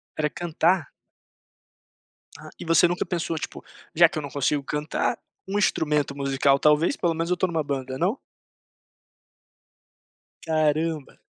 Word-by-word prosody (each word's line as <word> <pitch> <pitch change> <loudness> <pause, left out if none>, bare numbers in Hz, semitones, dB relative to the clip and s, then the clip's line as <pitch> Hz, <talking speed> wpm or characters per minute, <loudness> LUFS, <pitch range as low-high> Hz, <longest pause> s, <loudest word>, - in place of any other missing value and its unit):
Era 150 -1 0
cantar? 170 0 0 1.5
Ah, - - -11
e - - -6
você 165 +1 +5
nunca 175 +1 -2
pensou, 170 -2 -2
tipo, - - -6 0.3
já 170 0 +7
que 160 - -7
eu - - -1
não 145 - -6
consigo 140 +1 0
cantar, 150 +2 -2 0.3
um 195 +2 -2
instrumento 150 -7 +1
musical, 140 0 +2
talvez, 150 - +3
pelo 170 -1 0
menos 165 +1 -2
eu 180 - +1
tô 185 - +1
numa 165 -3 -1
banda, 135 -2 -4
não? 190 - 0 2.3
Caramba. 155 -1 0
155 Hz, 135 wpm, -25 LUFS, 145-170 Hz, 2.3 s, já